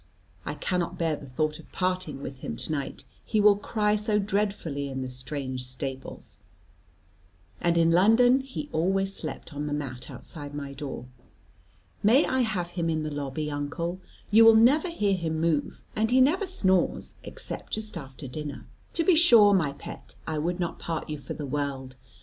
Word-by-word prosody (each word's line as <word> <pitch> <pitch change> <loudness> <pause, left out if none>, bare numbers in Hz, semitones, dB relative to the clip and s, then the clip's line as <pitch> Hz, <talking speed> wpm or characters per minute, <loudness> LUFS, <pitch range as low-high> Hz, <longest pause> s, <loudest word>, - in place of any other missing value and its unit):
I - - -2
cannot 180 -3 -2
bear 165 -2 +1
the 140 - -10
thought 155 +4 -1
of - - -15
parting 185 -6 -2
with 135 -1 -7
him - - -5
to - - -4
night, 140 -3 -3 0.2
he 215 - 0
will 205 0 +7
cry 210 0 +1
so 210 0 +1
dreadfully 200 -8 -1
in 130 -1 -3
the 130 - -5
strange 130 0 -4
stables; 130 -4 -6 1.2
and 170 0 +2
in 165 0 +4
London 225 +8 +6
he 270 +2 -6
always 195 +4 +1
slept 155 0 -6
on 145 +1 -3
the 145 - -2
mat 135 -4 -5
outside 145 -2 -8
my 140 -1 -5
door. 135 -3 -6 1.0
May 235 +8 +5
I 260 - 0
have 200 -8 -1
him 170 -2 -1
in 155 -1 0
the 155 - -3
lobby, 145 +1 -3
uncle, 170 +5 -3 0.3
you 225 +2 +8
will 225 0 +9
never 275 +10 +5
hear 210 -12 +1
him 165 -4 -1
move, 160 -3 0
and 220 +1 +1
he 255 +2 +4
never 325 +10 +4
snores 190 - +1
except - - -7
just 215 -1 -1
after 135 -3 -8
dinner?" 145 +2 -6 0.3
"To 330 - +1
be 370 - +5
sure, 235 -11 +7
my 165 -7 +2
pet; 140 - -10
I 155 -1 -2
would 175 +4 -1
not 175 -2 -2
part 160 -2 -4
you 150 - -4
for - - -6
the 150 - -5
world. 135 -2 -3
165 Hz, 180 wpm, -27 LUFS, 145-210 Hz, 1.2 s, will